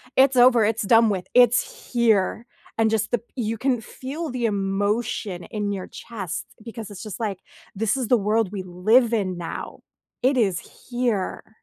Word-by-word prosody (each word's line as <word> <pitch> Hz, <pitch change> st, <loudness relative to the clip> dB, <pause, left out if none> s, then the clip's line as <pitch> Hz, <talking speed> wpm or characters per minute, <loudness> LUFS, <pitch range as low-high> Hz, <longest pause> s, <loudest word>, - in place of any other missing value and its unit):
it's 265 Hz, -1 st, +5 dB
over, 245 Hz, -2 st, +6 dB
it's 220 Hz, +1 st, +1 dB
done 225 Hz, +1 st, +5 dB
with, 185 Hz, -3 st, -2 dB
it's 245 Hz, -1 st, +3 dB
here", 230 Hz, -2 st, +2 dB, 0.3 s
and 225 Hz, -1 st, +3 dB
just 220 Hz, 0 st, 0 dB
the 240 Hz, -, +2 dB, 0.2 s
you 225 Hz, -3 st, -2 dB
can 250 Hz, 0 st, 0 dB
feel 295 Hz, +8 st, -6 dB
the 245 Hz, -1 st, -2 dB
emotion 200 Hz, -1 st, -1 dB
in 210 Hz, -2 st, -3 dB
your 190 Hz, -2 st, -5 dB
chest 200 Hz, -8 st, -6 dB, 0.2 s
because 225 Hz, -2 st, -8 dB
it's 200 Hz, 0 st, -8 dB
just 215 Hz, 0 st, -7 dB
like, 205 Hz, -5 st, -2 dB, 0.4 s
this 220 Hz, +4 st, 0 dB
is 255 Hz, -3 st, -2 dB
the 245 Hz, -, +4 dB
world 210 Hz, -1 st, +1 dB
we 190 Hz, -, -4 dB
live 215 Hz, +7 st, +3 dB
in 190 Hz, -5 st, 0 dB
now, 170 Hz, -, -6 dB, 0.4 s
it 260 Hz, +1 st, +3 dB
is 195 Hz, -7 st, +2 dB, 0.3 s
here. 235 Hz, -3 st, -2 dB
220 Hz, 170 wpm, -24 LUFS, 200-240 Hz, 0.4 s, over